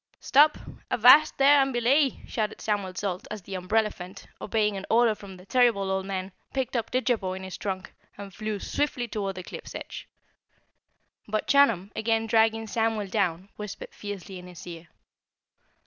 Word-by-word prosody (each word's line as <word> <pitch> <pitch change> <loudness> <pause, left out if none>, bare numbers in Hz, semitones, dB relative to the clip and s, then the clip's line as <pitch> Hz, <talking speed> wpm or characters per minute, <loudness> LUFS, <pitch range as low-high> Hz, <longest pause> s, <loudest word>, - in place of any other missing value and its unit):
"Stop! 300 +2 +5
Stop! - - -12 0.2
Avast 250 +6 +6
there 280 +1 +6
and 270 0 +1
belay!" 260 +3 +2
shouted 215 -2 -3
Samuel 200 -4 -2
Salt 185 -2 -3
as 215 -3 -7
the 195 - -9
umbrellaphant, 185 0 -2 0.2
obeying 210 -1 0
an 195 - -5
order 230 -1 +4
from 200 -3 -11
the 180 - -15
terrible 220 -5 +2
Old 190 0 -2
Man, 190 0 -4 0.2
picked 265 -1 -2
up 230 - -1
Didjabo 240 -7 0
in 190 - -7
his 190 -1 -6
trunk 190 -2 -5 0.2
and 200 -1 -9
flew 215 +1 -3
swiftly 265 -2 -2
toward 200 -3 -3
the 185 - -7
cliff's - - -9
edge. - - -7 1.2
But 215 0 -1
Chunum, 225 -9 +3
again 225 0 0
dragging 225 0 +2
Samuel 220 -2 -1
down, 185 -2 -1
whispered 210 -1 -7
fiercely 200 -2 -7
in 180 - -11
his 180 -2 -11
ear. 170 -1 -9
210 Hz, 165 wpm, -27 LUFS, 190-235 Hz, 1.2 s, Avast